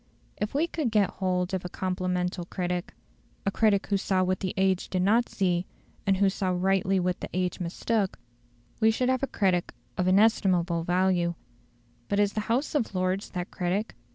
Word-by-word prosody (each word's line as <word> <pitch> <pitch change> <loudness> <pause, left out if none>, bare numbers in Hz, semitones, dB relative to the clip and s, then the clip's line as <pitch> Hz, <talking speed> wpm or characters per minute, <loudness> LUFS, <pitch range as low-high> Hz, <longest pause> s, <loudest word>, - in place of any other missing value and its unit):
If 210 +5 -3
we 305 +4 +3
could 315 -6 -2
get 210 -3 +2
hold 180 -1 -1
of 185 - -1
a 180 - -5
complemental 180 -1 -2
critic, 180 0 -3 0.5
a 200 - +2
critic 205 -2 +2
who 200 - +1
saw 190 -1 +1
what 185 0 0
the 185 -2 -3
age 190 -1 +1
did 185 -1 0
not 225 +5 +3
see, 180 -2 0 0.4
and 195 -1 +3
who 200 +1 +4
saw 190 0 -1
rightly 190 +1 +2
what 180 0 -1
the - - -6
age 185 0 -1
mistook, 190 +3 -1 0.6
we 220 -1 +5
should 250 +3 +1
have 260 -1 +1
a 275 - 0
critic 185 -7 0 0.2
of 180 - +2
inestimable 185 -4 +3
value. 175 -1 +2 0.7
But 200 - +1
is 205 -1 +2
the 215 - -1
House 255 +6 +1
of 235 -9 -1
Lords 185 +2 0
that 180 -1 -5
critic? 190 +5 -1
190 Hz, 180 wpm, -27 LUFS, 180-205 Hz, 0.7 s, we